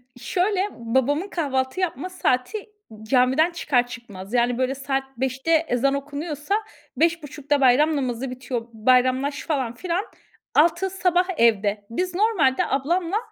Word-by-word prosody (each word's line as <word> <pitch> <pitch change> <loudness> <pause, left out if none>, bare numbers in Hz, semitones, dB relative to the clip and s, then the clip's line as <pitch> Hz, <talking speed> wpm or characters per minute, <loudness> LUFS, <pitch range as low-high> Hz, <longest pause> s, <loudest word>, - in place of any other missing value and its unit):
Şöyle, 370 - 0
babamın 265 - 0
kahvaltı 265 -5 -2
yapma 360 -2 -2
saati, 365 - -1 0.3
camiden 260 +8 +3
çıkar 280 -7 +1
çıkmaz. 220 -5 -10
Yani 240 0 +2
böyle 260 +1 0
saat 270 0 -2
05.00'te 265 +4 -2 0.2
ezan 260 +3 +1
okunuyorsa 290 +5 -3 0.4
05.30'da 295 -3 0
bayram 290 +5 +4
namazı 255 -1 -2
bitiyor, 245 -2 -5
bayramlaş 255 +5 +2
falan 265 -7 -1
filan, 350 - -2 0.5
06.00 345 +5 +3
sabah, 360 -1 +1
evde. 210 -3 +2
Biz 360 +9 -2
normalde, 370 -11 +2
ablamla 340 +8 0
275 Hz, 120 wpm, -23 LUFS, 250-335 Hz, 0.5 s, bayram